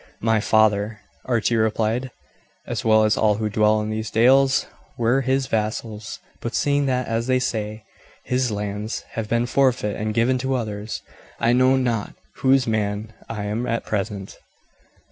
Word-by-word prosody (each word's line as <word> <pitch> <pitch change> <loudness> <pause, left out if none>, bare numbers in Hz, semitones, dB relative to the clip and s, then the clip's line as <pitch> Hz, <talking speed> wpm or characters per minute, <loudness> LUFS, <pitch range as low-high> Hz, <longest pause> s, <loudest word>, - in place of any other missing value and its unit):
"My 110 -1 +3
father," 110 0 +2 0.3
Archie 120 -1 +1
replied, 110 +3 0 0.6
"as - - -3
well 110 -1 +5
as 110 0 +3
all 105 -1 +3
who 110 0 -2
dwell 105 +1 +3
in 105 0 -3
these 110 0 -3
dales, 135 +4 +4 0.3
were 120 +3 +2
his 135 +1 +1
vassals; 110 -1 -3 0.2
but 115 - -4
seeing 145 -1 +2
that, 125 -1 0
as 115 +1 -1
they 130 0 +3
say, 110 -3 -3 0.4
his 125 0 0
lands 105 +1 -3
have 110 -2 -4
been 115 +1 +1
forfeit 125 -5 +1
and 110 0 -1
given 125 +2 +2
to 130 +1 -1
others, 105 -3 -4 0.4
I 120 +1 +3
know 130 +1 +4
not 120 -5 -1 0.2
whose 135 -1 +3
man 110 0 -2 0.2
I 110 -3 -4
am 110 +4 -2
at 115 0 -1
present." 100 -2 -4
115 Hz, 160 wpm, -23 LUFS, 105-125 Hz, 0.6 s, well